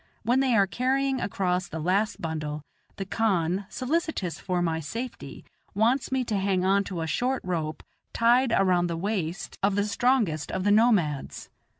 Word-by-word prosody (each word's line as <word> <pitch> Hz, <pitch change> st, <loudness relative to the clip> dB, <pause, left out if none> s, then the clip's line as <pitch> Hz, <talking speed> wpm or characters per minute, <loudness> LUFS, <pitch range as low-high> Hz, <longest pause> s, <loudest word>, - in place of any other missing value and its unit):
When 245 Hz, +4 st, +2 dB
they 260 Hz, -3 st, +2 dB
are 200 Hz, -2 st, +5 dB
carrying 265 Hz, +5 st, 0 dB
across 185 Hz, -2 st, -1 dB
the 160 Hz, -, -6 dB
last 190 Hz, +7 st, 0 dB
bundle, 155 Hz, -2 st, -4 dB, 0.3 s
the 195 Hz, -, -5 dB
khan, 190 Hz, -3 st, 0 dB
solicitous 260 Hz, -, -2 dB
for 180 Hz, -2 st, -1 dB
my 165 Hz, -2 st, 0 dB
safety, 225 Hz, -, -7 dB, 0.3 s
wants 235 Hz, +7 st, +2 dB
me 260 Hz, -1 st, +1 dB
to 220 Hz, -4 st, -1 dB
hang 190 Hz, -1 st, +1 dB
on 200 Hz, +1 st, +3 dB
to 180 Hz, -4 st, -4 dB
a -, -, -1 dB
short 250 Hz, -, -1 dB
rope 160 Hz, -4 st, -3 dB, 0.3 s
tied 240 Hz, +2 st, +3 dB
around 180 Hz, -3 st, +3 dB
the 170 Hz, -1 st, -3 dB
waist 190 Hz, -1 st, -3 dB
of 200 Hz, 0 st, +2 dB
the 205 Hz, 0 st, +1 dB
strongest 210 Hz, -, +1 dB
of 185 Hz, -, -2 dB
the 205 Hz, -, +3 dB
nomads. 205 Hz, -, +2 dB
195 Hz, 170 wpm, -26 LUFS, 170-235 Hz, 0.3 s, are